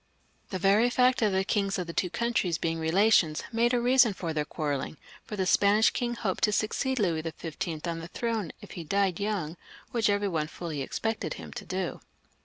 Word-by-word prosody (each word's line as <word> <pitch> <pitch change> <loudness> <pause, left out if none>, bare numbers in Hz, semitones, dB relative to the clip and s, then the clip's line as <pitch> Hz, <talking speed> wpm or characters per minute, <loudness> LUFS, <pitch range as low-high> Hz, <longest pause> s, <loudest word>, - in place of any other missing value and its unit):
The 190 - -2
very 200 +6 +4
fact 250 0 +3
of 215 -2 +3
the 190 0 +2
kings 200 0 0
of 180 - -2
the 170 - -7
two 180 - 0
coimtries 210 -6 0
being 165 -1 -1
relations 165 -1 +3
made 235 +1 +2
a 245 - +2
reason 245 -2 +5
for 165 -3 -3
their 150 -1 -1
quarrelling, 145 -2 -3 0.3
for 210 - -6
the 190 -2 0
Span 200 +1 +4
ish 220 - +5
king 240 -1 -2
hoped 200 -5 -2
to 210 - 0
succeed 260 +5 0
Louis 175 -8 +1
XV. 165 -1 -6 0.3
on 165 -1 -3
ttie 165 - -8
throne 225 -5 -2
if - - -11
he 170 - -6
died 195 +1 +1
young, 195 -6 -2 0.3
which 225 -3 +2
every 205 0 +1
one 160 -5 -1
fully 160 -3 -5
expected 225 +11 -2
him - - -9
to - - -7
do. - - -3
195 Hz, 205 wpm, -28 LUFS, 165-225 Hz, 0.3 s, reason